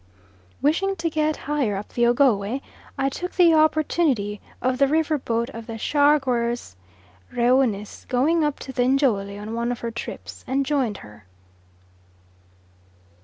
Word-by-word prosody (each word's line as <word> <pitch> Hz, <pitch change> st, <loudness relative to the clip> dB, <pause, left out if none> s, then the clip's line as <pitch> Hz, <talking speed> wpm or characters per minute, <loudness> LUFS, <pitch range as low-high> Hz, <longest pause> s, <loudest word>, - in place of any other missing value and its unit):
Wishing 380 Hz, +7 st, +2 dB
to 330 Hz, -2 st, -2 dB
get 305 Hz, -1 st, 0 dB
higher 275 Hz, -8 st, 0 dB
up 200 Hz, +2 st, -6 dB
the 240 Hz, 0 st, +2 dB
Ogowe, 240 Hz, -2 st, +2 dB, 0.4 s
I 270 Hz, 0 st, +1 dB
took 355 Hz, +6 st, -4 dB
the 345 Hz, -3 st, +6 dB
opportunity 310 Hz, -9 st, +2 dB, 0.2 s
of 255 Hz, 0 st, 0 dB
the 275 Hz, -, +5 dB
river 310 Hz, +1 st, +1 dB
boat 235 Hz, -1 st, -2 dB
of 230 Hz, 0 st, -9 dB
the 225 Hz, -1 st, -5 dB
Chargeurs 250 Hz, -, +1 dB, 0.6 s
Reunis 240 Hz, -4 st, +1 dB
going 305 Hz, +6 st, +2 dB
up 295 Hz, -2 st, 0 dB
to 265 Hz, -, -7 dB
the 255 Hz, -, 0 dB
Njole 215 Hz, -8 st, +1 dB
on 210 Hz, +2 st, -6 dB
one 235 Hz, +1 st, -1 dB
of 245 Hz, -, -5 dB
her 235 Hz, -, -3 dB
trips, 230 Hz, -, -8 dB
and 270 Hz, +1 st, 0 dB
joined 260 Hz, -8 st, 0 dB
her. 105 Hz, -2 st, -16 dB
260 Hz, 145 wpm, -23 LUFS, 230-295 Hz, 0.6 s, the